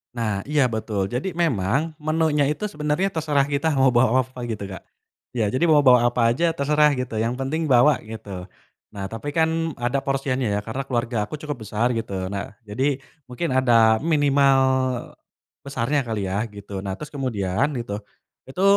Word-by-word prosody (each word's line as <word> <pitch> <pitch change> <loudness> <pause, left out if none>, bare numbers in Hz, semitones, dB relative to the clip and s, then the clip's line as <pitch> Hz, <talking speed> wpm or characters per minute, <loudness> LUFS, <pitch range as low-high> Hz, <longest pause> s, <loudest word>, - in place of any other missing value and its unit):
Nah 110 -4 -1
iya 150 -1 +3
betul 105 -3 -2
jadi 150 +10 -3
memang 140 - +1
menunya 155 -2 +1
itu 150 +6 -2
sebenernya 150 +6 0
terserah 150 -5 +1
kita 145 +3 -1
mau 135 -1 +4
bawa 125 +1 +4
apa 130 0 -13
gitu 110 -3 -4
Kak, 95 - -8 0.5
ya 110 -4 +1
jadi 130 - 0
bawa-bawa 130 -6 +6
apa 120 -1 +2
aja 165 +6 +1
terserah 150 0 +3
gitu 125 -4 -3
yang 115 +2 0
penting 145 +5 -2
bawa 135 +3 +5
gitu, 100 -5 -7 0.5
nah 95 -1 -5
tapi 145 +6 -5
kan 160 -1 +1
ada 120 +3 -1
porsiannya 135 -2 -1
ya - - +1
karena 120 +5 -4
keluarga 120 -2 -1
aku - - -5
cukup 150 -3 -6
besar 115 +4 +1
gitu 95 -5 -3
nah 100 +1 -5
jadi 130 +7 0 0.3
mungkin 130 +6 -3
ada 115 -4 +4
minimal, 140 -3 +3 1.1
besarnya 140 +1 0
kali 110 -3 -2
ya 105 +4 -1
gitu 100 -2 -8
nah 95 0 -4
terus 150 +7 -9
kemudian 120 -4 -1
gitu, 115 -4 -4 0.5
itu 160 +8 -3
130 Hz, 165 wpm, -23 LUFS, 110-150 Hz, 1.1 s, bawa-bawa